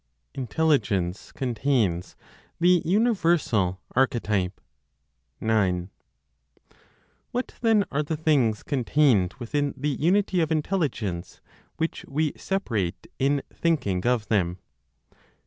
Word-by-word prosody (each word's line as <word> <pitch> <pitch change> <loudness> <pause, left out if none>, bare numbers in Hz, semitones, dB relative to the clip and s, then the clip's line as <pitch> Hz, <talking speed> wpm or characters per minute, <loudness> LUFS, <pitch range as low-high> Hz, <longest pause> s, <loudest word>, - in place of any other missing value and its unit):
INTELLIGENCE 120 - 0
CONTAINS 115 -8 0 0.4
THE 175 0 +5
UNIVERSAL 170 - +2 0.2
ARCHETYPE. 105 -8 +1 0.8
9. 95 -5 +1 1.4
What 250 +1 -3
then 220 -4 +4
are 145 - +1
the 150 +1 -3
things 140 -9 +2
contained 125 -8 +2
within 145 +4 -2
the 145 +3 -1
unity 180 +6 +2
of 160 -1 0
Intelligence 145 - -2 0.4
which 160 0 -2
we 150 +1 0
separate 115 - -2
in 140 +1 +2
thinking 120 - 0
of 120 -4 +1
them? 90 -5 +1
135 Hz, 95 wpm, -25 LUFS, 105-160 Hz, 1.4 s, THE